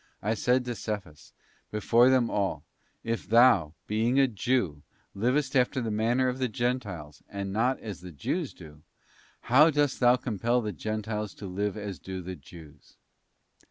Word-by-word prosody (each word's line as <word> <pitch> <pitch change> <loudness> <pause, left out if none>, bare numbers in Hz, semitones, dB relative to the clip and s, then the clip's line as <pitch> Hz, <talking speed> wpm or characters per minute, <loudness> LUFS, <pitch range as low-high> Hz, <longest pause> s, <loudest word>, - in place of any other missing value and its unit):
I 105 +3 +1
said 125 +3 +1
to 120 - -2
Cephas, 100 -8 -6 0.4
before 115 +4 +4
them 130 -3 +3
all: 95 -8 -1 0.4
If 115 -4 -3
thou, 115 -10 +5
being 115 +5 +1
a 135 - +5
Jew, 105 - -1 0.3
livest 130 +6 0
after 130 +1 +2
the 115 -3 -2
manner 115 +5 +1
of 125 +1 -2
the 130 - +1
Gentiles, 105 - -3
and 100 -1 -4
not 125 +5 +1
as 105 -6 -7
the 90 - -9
Jews 70 - -3
do, 75 -1 -14 0.6
how 145 +7 +6
dost 145 -3 +1
thou 125 -1 +6
compel 120 0 0
the 105 -3 -3
Gentiles 105 -1 -4
to 100 - -9
live 100 +3 -2
as 100 -3 -6
do 95 -1 -6
the 90 +1 -6
Jews? 75 -5 -15
110 Hz, 160 wpm, -28 LUFS, 95-125 Hz, 0.6 s, how